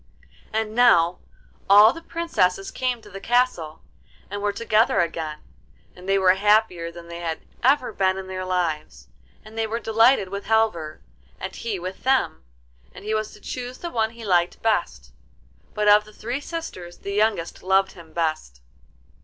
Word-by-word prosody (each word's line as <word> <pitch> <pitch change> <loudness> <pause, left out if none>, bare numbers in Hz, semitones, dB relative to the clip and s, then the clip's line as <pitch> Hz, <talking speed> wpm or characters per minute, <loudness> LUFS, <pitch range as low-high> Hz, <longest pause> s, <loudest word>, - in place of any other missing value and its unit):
And 220 0 -2
now 180 -8 +4 0.5
all 205 +3 +8
the 330 - -9
Princesses 195 - -1
came 250 -3 -2
to 210 - -13
the 195 - -7
castle, 240 -10 0 0.5
and 205 0 -4
were 205 0 +1
together 220 +1 +2
again, 160 -2 -2 0.6
and 180 +1 -10
they 195 - +4
were 185 -1 +5
happier 195 -4 +2
than 170 0 -12
they 170 0 -8
had 165 -2 -4 0.2
ever 255 -2 +2
been 190 -1 +1
in 190 - -6
their 185 0 -5
lives; 155 - -3 0.4
and 215 +1 -13
they 225 0 -1
were 230 +2 -3
delighted 225 -2 +3
with 200 +1 -6
Halvor, 215 -9 0 0.4
and 190 0 -6
he 220 -4 -3
with 185 +1 -7
them, 260 -12 +1 0.5
and - - -11
he 215 - -1
was 215 0 -1
to - - -14
choose 250 +3 -6
the 345 - -6
one 220 -2 +1
he 230 0 -11
liked 175 -3 +1
best; 65 - -1 0.6
but 210 0 0
of 210 0 +7
the 215 - -16
three 240 +6 -4
sisters 285 - -7
the 200 - -6
youngest 205 -5 0
loved 190 +1 +2
him 165 -2 -14
best. 155 - -2
200 Hz, 170 wpm, -23 LUFS, 175-225 Hz, 0.6 s, all